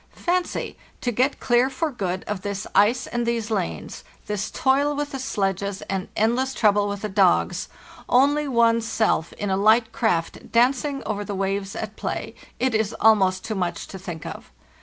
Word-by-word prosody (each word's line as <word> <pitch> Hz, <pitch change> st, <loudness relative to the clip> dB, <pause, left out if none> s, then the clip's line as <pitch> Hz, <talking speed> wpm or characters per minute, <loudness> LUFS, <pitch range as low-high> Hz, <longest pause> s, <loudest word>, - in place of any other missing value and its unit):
Fancy, 355 Hz, 0 st, -1 dB, 0.2 s
to 245 Hz, -, 0 dB
get 255 Hz, +5 st, +1 dB
clear 245 Hz, +2 st, +3 dB
for 315 Hz, +3 st, -2 dB
good 190 Hz, -7 st, -3 dB
of 210 Hz, -3 st, -4 dB
this 200 Hz, +1 st, -4 dB
ice 220 Hz, +5 st, +4 dB
and 240 Hz, 0 st, -2 dB
these 235 Hz, -1 st, -1 dB
lanes, 80 Hz, -, -3 dB, 0.2 s
this 210 Hz, -1 st, -2 dB
toil 280 Hz, +2 st, +2 dB
with 290 Hz, 0 st, -3 dB
the 270 Hz, -, -4 dB
sledges 200 Hz, -4 st, -2 dB
and 190 Hz, -1 st, -3 dB
endless 250 Hz, +5 st, +1 dB
trouble 205 Hz, -1 st, +3 dB
with 200 Hz, 0 st, -4 dB
the -, -, 0 dB
dogs, 190 Hz, -, +2 dB, 0.4 s
only 285 Hz, +4 st, +3 dB
one's 230 Hz, -2 st, +3 dB
self 220 Hz, -7 st, +1 dB
in 205 Hz, -1 st, -3 dB
a 190 Hz, -, +2 dB
hght 220 Hz, +2 st, +4 dB
craft 175 Hz, -10 st, -1 dB
danc 245 Hz, +2 st, +3 dB
ing 285 Hz, -2 st, -3 dB
over 205 Hz, -1 st, -2 dB
the 205 Hz, -1 st, -5 dB
waves 195 Hz, 0 st, -2 dB
at 215 Hz, -1 st, -5 dB
play! -, -, -4 dB, 0.3 s
It 260 Hz, -1 st, +1 dB
is 220 Hz, -2 st, 0 dB
almost 190 Hz, -4 st, +4 dB
too 220 Hz, -, -2 dB
much 180 Hz, -4 st, -2 dB
to 190 Hz, -, -8 dB
think 175 Hz, -4 st, -7 dB
of. -, -, -8 dB
220 Hz, 180 wpm, -24 LUFS, 195-250 Hz, 0.4 s, ice